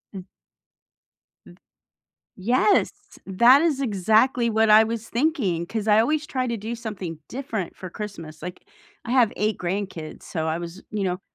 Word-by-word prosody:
M 185 -2 -7 1.2
M - - -15 0.8
Yes! 245 - +2 0.4
That 235 +9 +6
is 300 -5 +1
exactly 230 +2 +2
what 220 0 +3
I 215 +1 +8
was 225 0 -4
thinking, 230 - 0
'cause 220 +1 -3
I 210 +1 +6
always 300 +6 0
try 255 -3 -2
to 235 -1 -2
do 220 +3 -5
something 195 -8 -6
different 230 -8 -5
for 185 - -8
Christmas, 170 -7 -8
like, 180 0 -8 0.4
I 235 - -6
have 245 -5 +4
8 215 0 0
grandkids, 180 -4 -4
so 160 -2 -4
I 160 +1 -1
was, 175 +2 -8
you 210 -2 -2
know 180 0 -2
215 Hz, 160 wpm, -24 LUFS, 185-235 Hz, 1.2 s, I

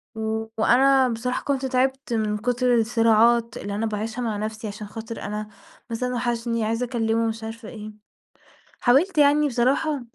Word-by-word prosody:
و 220 0 -2
وأنا 265 +4 +4
بصراحة 245 +2 -3
كنت 275 -2 -1
تعبت 265 0 0
من 215 -2 0
كتر 245 +2 +1
الصراعات 230 0 +3
اللي 200 0 -5
أنا 220 +2 -1
باعيشها 220 +2 -3
مع 225 -3 -2
نفسي 215 +1 -4
عشان 210 0 -7
خاطر 225 +2 -7
أنا 210 +1 -4 0.4
بس 230 +1 -3
أنا 250 0 -1
وحشني 235 -1 -1
عايزة 230 +3 -1
أكلمه 230 -2 0
مش 225 0 -4
عارفة 225 0 -7
إيه، 215 -1 -8 0.9
حاولت 295 +9 +3
يعني 295 0 +5
بصراحة 275 +4 +1
230 Hz, 160 wpm, -24 LUFS, 220-250 Hz, 0.9 s, يعني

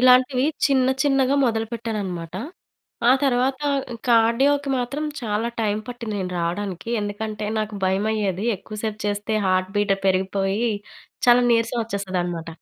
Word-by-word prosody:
ఇలాంటివి 255 +1 +5 0.2
చిన్న, 265 -2 +3 0.2
చిన్నగా 270 -1 +3
మొదలు 225 -1 0
పెట్టానన్నమాట. 195 -8 -4 0.8
ఆ - - +8
తరువాత 260 0 +2 0.5
కార్డియోకి 265 +5 +3
మాత్రం 275 +5 -2 0.2
చాలా 220 0 -1
టైమ్ 210 -1 0
పట్టింది 235 -3 -5
నేను 180 -1 -3
రావడానికి. 180 +3 -3
ఎందుకంటే, 210 +1 -4
నాకు 215 -1 -3
భయమయ్యేది. 200 +1 0
ఎక్కువ 215 +3 -9
సేపు 215 -1 -3
చేస్తే, 205 +2 -1
హార్ట్ 185 0 +1
బీట్ 205 -1 +3
పెరిగిపోయి 195 +4 +1 0.6
చాలా 245 0 +7
నీరసం 230 +1 +2
వచ్చేస్తదన్నమాట. 180 -5 -3
215 Hz, 125 wpm, -23 LUFS, 195-245 Hz, 0.8 s, ఆ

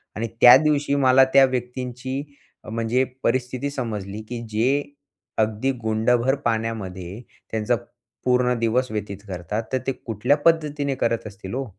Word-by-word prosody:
आणि 115 +2 -2
त्या 120 - +11
दिवशी 145 -2 +1
मला 135 -1 +5
त्या 135 0 +8
व्यक्तींची 125 +1 -4 0.4
म्हणजे 115 +3 0 0.2
परिस्थिती 130 +2 0
समजली, 105 -6 -4
की 120 -1 -4
जे 125 +7 +1 0.6
अगदी 110 +4 +1
गुंडभर 120 +4 +2
पाण्यामध्ये 110 -4 -3 0.3
त्यांचा 110 +2 +1 0.5
पूर्ण 125 0 +3
दिवस 120 +2 +1
व्यतीत 105 -2 -4
करतात. 95 +4 -4
तर - - +3
ते - - +2
कुठल्या 125 +3 0
पद्धतीने 150 -3 +1
करत 115 -3 -1
असतील 100 0 -9
हो? 135 0 -2
120 Hz, 130 wpm, -23 LUFS, 110-130 Hz, 0.6 s, त्या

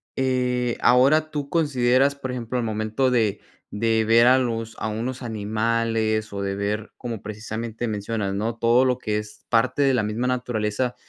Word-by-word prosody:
eh, 125 -2 0
ahora 140 +6 +4
tú 145 -2 -4
consideras, 140 -3 +2
por 130 -2 -5
ejemplo, 125 0 -4
al 120 - 0
momento 110 +4 0
de 110 -5 +1 0.3
de 110 +1 +1
ver 115 +2 +5
a 130 +1 +6
los 115 -3 -2
a - - -2
unos 120 +5 -4
animales, 110 -1 -1
o 100 0 -4
de 100 0 -2
ver 105 +2 -3
como 115 -4 -6
precisamente 110 +2 -5
mencionas, 105 -1 -2
¿no? 110 +3 -2
Todo 120 +3 +4
lo 125 -1 +1
que 105 -4 -2
es 105 0 -8
parte 125 +4 +2
de 135 -1 +4
la 125 - +1
misma 110 +4 -2
naturaleza, 125 -1 -1
115 Hz, 175 wpm, -23 LUFS, 110-125 Hz, 0.3 s, a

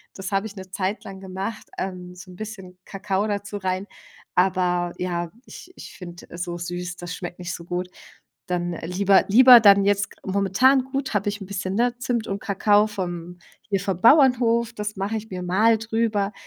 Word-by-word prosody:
das 190 +1 -6
habe 195 +2 0
ich 205 - -12
'ne 190 -1 -10
Zeit 195 +2 -2
lang 195 -1 -9
gemacht, 195 +3 -6
ähm, 180 -1 -5
so 180 +1 -12
'n 180 - -12
bisschen 190 -3 -9
Kakao 195 +1 -2
dazu 205 0 -3
rein. 185 0 -2 0.5
Aber 180 -1 +1
ja, 175 -2 -3
ich 365 - -12
ich - - -11
find, 175 -2 -11
äh, 170 - -8
so 175 -1 -4
süß, 175 +1 -5
das 175 0 -6
schmeckt 175 -1 -7
nicht 175 -1 -5
so 170 - -8
gut. 180 +1 -3 0.6
Dann, 175 -1 -2
äh, 165 - -6
lieber 195 +2 +3
lieber 250 +3 +9
dann 200 -2 +6
jetzt 205 0 +1
gr 190 - -8
momentan 225 +8 +3
gut, 270 -1 -3
habe 205 -1 0
ich 205 +1 -5
'n 195 - -8
bisschen 190 0 -4
'ne 245 +2 +1
Zimt 240 -3 -2
und 195 0 -3
Kakao 205 +1 +3
vom 175 -4 -5 0.3
hier 200 -2 +1
vom 190 -2 -3
Bauernhof. 235 -3 +4
Das 210 -1 -5
mache 200 +3 -2
ich 220 +1 -8
mir 180 -1 -5
mal 215 +6 +3
drüber. 225 -2 -1
195 Hz, 195 wpm, -23 LUFS, 180-215 Hz, 0.6 s, lieber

